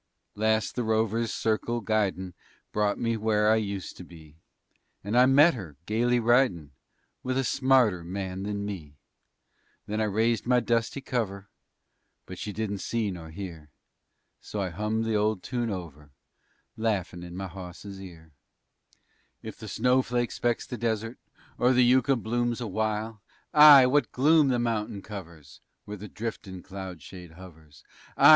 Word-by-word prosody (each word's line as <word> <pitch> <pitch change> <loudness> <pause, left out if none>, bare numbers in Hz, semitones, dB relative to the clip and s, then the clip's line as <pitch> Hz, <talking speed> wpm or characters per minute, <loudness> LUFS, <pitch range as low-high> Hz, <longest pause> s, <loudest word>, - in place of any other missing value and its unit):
_ - - -52 0.3
Last 110 +1 +1
the 125 - -2
rover's 110 +1 0
circle 115 +2 -1
guidin' 100 -5 -1 0.4
Brought 105 -1 0
me 115 -1 0
where 105 0 +2
I 110 - +4
used 100 -4 -4
to - - -9
be, 80 -3 -15 0.7
And 105 +4 -3
I 125 +1 +6
met 145 +6 +6
her, 90 - -8
gaily 120 +3 +1
ridin' 115 - +2 0.5
With 130 0 -2
a 135 - +1
smarter 125 -9 +3
man 95 +1 -5
than 100 0 -3
me. 85 -8 -7 0.9
Then 105 +1 -2
I - - +2
raised 110 +2 0
my 125 0 +4
dusty 120 +3 -1
cover 105 -6 -3 0.8
But 95 - -9
she 105 - -4
didn't 100 -1 -3
see 110 -2 -1
nor 85 -3 -8
hear, 80 -3 -8 0.7
So 105 - -6
I 95 -2 -1
hummed 105 +5 -1
the 115 - -1
old 105 -3 0
tune 120 0 -2
over, 80 -7 -7 0.7
Laughin' 100 -6 -2
in 90 0 -8
my 95 - -4
hawse's 95 +2 -9
ear: 80 -4 -12 1.1
If - - -8
the 110 - -8
snowflake 120 +2 +1
specks 120 -1 -1
the 125 - -7
desert 115 0 -2 0.4
Or 125 +1 +4
the 125 0 +5
yucca 130 +2 +4
blooms 120 +1 -1
awhile. 110 -1 -2 0.3
Ay! 150 -3 +10
what 140 +3 +2
gloom 150 +3 +4
the 130 -2 +2
mountain 110 -4 -2
covers 80 - -10 0.2
Where 105 0 -7
the 105 +1 -9
driftin' 95 -5 -6
cloud 95 -5 -8
shade 90 -1 -11
hovers! 80 -4 -15 0.3
_Ay! - - +8
105 Hz, 155 wpm, -27 LUFS, 95-120 Hz, 1.1 s, Ay